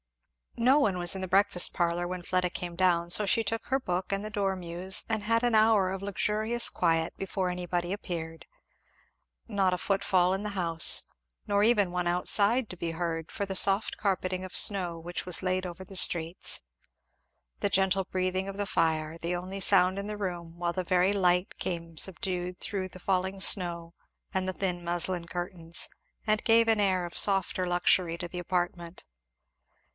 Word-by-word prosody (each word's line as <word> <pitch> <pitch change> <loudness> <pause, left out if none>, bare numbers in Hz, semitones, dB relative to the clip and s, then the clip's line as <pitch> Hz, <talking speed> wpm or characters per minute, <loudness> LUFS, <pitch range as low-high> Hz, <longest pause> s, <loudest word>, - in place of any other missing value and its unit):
No 255 +5 +4
one 200 -10 +1
was 175 +1 +1
in 190 - -4
the 185 - -3
breakfast 190 -1 +3
parlour 175 0 -1
when 180 0 -6
Fleda 180 0 0
came 175 -1 -6
down, 170 -2 +1
so 210 +4 +5
she 225 +4 +2
took 225 +2 -3
her 265 +1 0
book 180 -6 -3
and 195 +1 -2
the 215 - -7
dormeuse 190 -2 -1
and 220 -2 -2
had 230 +2 +1
an 240 -2 +2
hour 215 -3 +4
of 190 0 -5
luxurious 215 +4 +1
quiet 165 -2 0
before 190 -1 -3
anybody 175 0 -3
appeared. 165 -5 -7 1.0
Not 195 -4 +1
a - - -1
foot 195 +2 -1
fall 185 -1 +2
in 195 +2 -3
the 210 - -3
house; 170 -5 +3 0.4
nor 205 0 +2
even 210 -5 +2
one 180 0 -2
outside 205 +7 +3
to - - -8
be 170 -1 -3
heard, 165 -1 -4
for 200 - -3
the 195 -1 -5
soft 195 +2 +3
carpeting 185 -2 -2
of 185 - -8
snow 180 -5 +2
which 175 +1 -6
was 180 0 0
laid 185 0 -1
over 180 +2 -9
the 190 +1 -13
streets. 170 -1 +3 1.0
The 200 - 0
gentle 195 0 +2
breathing 185 +1 -2
of 195 0 -7
the 205 - -2
fire 160 -3 -1
the 170 +2 -2
only 185 +2 -6
sound 185 0 +4
in 200 - -5
the 210 0 -5
room; 175 -4 -6
while 170 0 -2
the 185 - -3
very 185 +2 +2
light 180 -2 +1
came 170 -2 -5
subdued 180 0 -1
through 190 -2 -4
the 185 - -12
falling 190 +1 -1
snow 170 -3 +2 0.4
and 190 -1 -1
the 185 - -2
thin 180 -2 -3
muslin 175 0 -2
curtains, 175 -2 -2 0.4
and 215 0 +1
gave 230 0 +4
an 225 -1 +2
air 190 -3 +1
of 175 - -6
softer 195 -2 +3
luxury 175 -1 +1
to 175 - -6
the 180 +1 -7
apartment. 175 -1 -4
185 Hz, 185 wpm, -28 LUFS, 175-200 Hz, 1.0 s, so